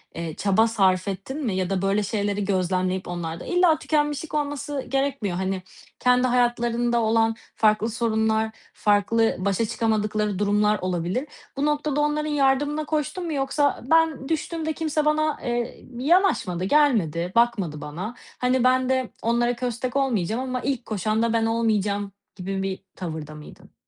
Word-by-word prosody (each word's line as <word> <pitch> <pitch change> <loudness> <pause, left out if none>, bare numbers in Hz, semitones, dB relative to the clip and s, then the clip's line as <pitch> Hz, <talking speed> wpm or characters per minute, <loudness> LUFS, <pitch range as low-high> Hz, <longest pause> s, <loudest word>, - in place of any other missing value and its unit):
eee, 165 -2 -5
çaba 205 +3 +3
sarf 190 -4 +2
ettin 250 +10 -4
mi 205 - -1
ya 185 -1 -1
da 195 -1 0
böyle 200 +2 +1
şeyleri 205 -1 -1
gözlemleyip 185 -1 0
onlarda 170 -1 -5
illa 355 -3 +3
tükenmişlik 295 -1 -1
olması 290 -1 -2
gerekmiyor, 270 -9 -1
hani, 190 0 -2 0.4
kendi 250 0 +3
hayatlarında 240 -1 +1
olan 225 0 +2 0.2
farklı 215 +1 +3
sorunlar, 220 -1 0 0.2
farklı 215 +2 +2
başa 200 +4 0
çıkamadıkları 215 -3 0
durumlar 210 0 +2
olabilir. 185 - -2 0.3
Bu 285 - +1
noktada 295 -1 0
onların 300 +1 0
yardımına 290 +2 +1
koştun 310 +4 -2
mu 325 - -3
yoksa 280 0 0
"Ben 320 -4 +3
düştüğümde 320 0 -2
kimse 310 -1 -1
bana, 305 0 +2
eee, 240 0 -3
yanaşmadı, 260 - +2
gelmedi, 190 - +2
bakmadı 200 -11 +1
bana, 185 +11 -6 0.2
hani, 250 0 +2
ben 255 0 +3
de 260 -2 +1
onlara 240 +1 +1
köstek 245 +1 -3
olmayacağım 235 -5 0
ama 255 -1 -2
ilk 260 -2 -2
koşan 215 +1 -1
da 230 - +1
ben 225 -1 +2
olmayacağım." 225 -1 +2 0.6
gibi 190 +1 -3
bir 190 0 -4
tavırda 155 -4 -6
mıydın? 150 - -13
230 Hz, 145 wpm, -24 LUFS, 195-275 Hz, 0.6 s, çaba